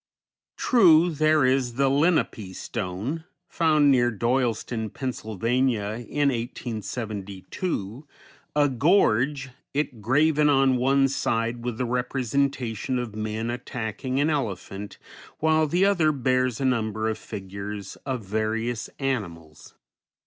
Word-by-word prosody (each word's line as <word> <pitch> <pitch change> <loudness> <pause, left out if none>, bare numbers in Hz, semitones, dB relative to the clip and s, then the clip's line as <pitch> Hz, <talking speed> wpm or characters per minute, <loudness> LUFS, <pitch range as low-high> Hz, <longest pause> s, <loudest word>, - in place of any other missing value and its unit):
True, 175 -8 +5
there 155 -2 +3
is 130 -2 +1
"The 135 +1 +2
Lenape 135 - +1
Stone," 115 - -4 0.2
found 155 -3 +3
near 120 -2 +4
Doyleston, 115 -1 -1
Pa., 130 - -8
in 130 - +1
1872, 115 - -2 0.5
a 145 -1 +4
gorget 135 - +1
graven 150 +6 +3
on 135 -2 +4
one 135 +2 +3
side 115 -3 -1
with 120 -2 -3
the 125 - -1
representation 125 0 -1
of 120 -3 -4
men 110 +2 -3
attacking 125 +2 -4
an 150 +3 +2
elephant, 100 - -4 0.4
while 155 0 +2
the 175 +6 +2
other 175 -6 +3
bears 130 -3 0
a 135 - -1
number 110 -3 0
of 110 - -2
figures 100 0 -7
of 130 -6 -5
various 110 +3 -2
animals. 85 - -4
125 Hz, 110 wpm, -25 LUFS, 110-140 Hz, 0.5 s, True